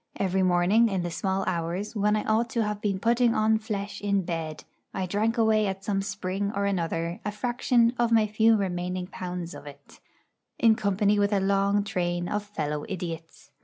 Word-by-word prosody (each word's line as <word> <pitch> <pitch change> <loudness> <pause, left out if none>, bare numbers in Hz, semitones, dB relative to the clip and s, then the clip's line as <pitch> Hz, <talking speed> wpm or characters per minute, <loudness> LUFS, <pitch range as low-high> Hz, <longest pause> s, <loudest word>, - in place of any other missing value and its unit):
Every 190 0 0
morning, 185 +6 +4
in 190 -3 -1
the 175 - -3
small 190 +2 -1
hours, 175 +6 -2
when 210 0 +2
I 215 - -1
ought 225 +2 +1
to 230 - +2
have 210 -1 -3
been 200 -2 0
putting 235 +3 +2
on 220 0 +3
flesh 205 -2 -5
in 200 -1 +1
bed, 165 -3 -4 0.3
I 190 - -1
drank 215 +5 0
away 220 -2 +3
at 195 0 -4
some 195 -1 0
spring 195 0 -3
or 200 0 0
another 170 -2 -2
a 210 - -2
fraction 240 +2 +1
of 235 -1 +2
my 225 -2 +5
few 220 +2 +3
remaining 180 -1 -2
pounds 180 -1 -6
of - - -10
it, 140 0 -14 0.6
in 230 -1 +5
company 205 0 +1
with 205 0 +2
a 200 - +2
long 200 +1 +2
train 175 -3 -2
of 210 - -1
fellow 150 -8 -4
idiots. 165 -3 -7
200 Hz, 190 wpm, -27 LUFS, 180-215 Hz, 0.6 s, my